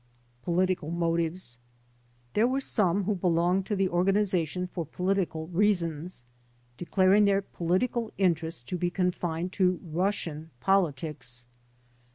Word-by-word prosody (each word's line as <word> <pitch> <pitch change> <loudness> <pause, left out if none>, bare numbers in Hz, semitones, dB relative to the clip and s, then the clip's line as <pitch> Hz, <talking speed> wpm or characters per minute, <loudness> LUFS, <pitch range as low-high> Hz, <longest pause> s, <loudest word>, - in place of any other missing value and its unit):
Political 180 -1 0 1.4
There 220 +3 +4
were 265 +2 0
some 200 -7 +1
who 210 +3 +1
belonged 180 +1 +1
to 210 - 0
the 195 -1 +2
organization 180 -1 +1
for 180 -1 -4
political 180 0 -1
reasons, 175 -6 0 0.5
declaring 190 +6 +3
their 200 0 +3
political 215 +7 -1
interest 165 -8 0
to 180 - -2
be 175 - +1
confined 175 -1 -1
to 185 -2 +2
Russian 165 -2 -2
politics. 150 -7 0
180 Hz, 110 wpm, -28 LUFS, 165-195 Hz, 1.4 s, There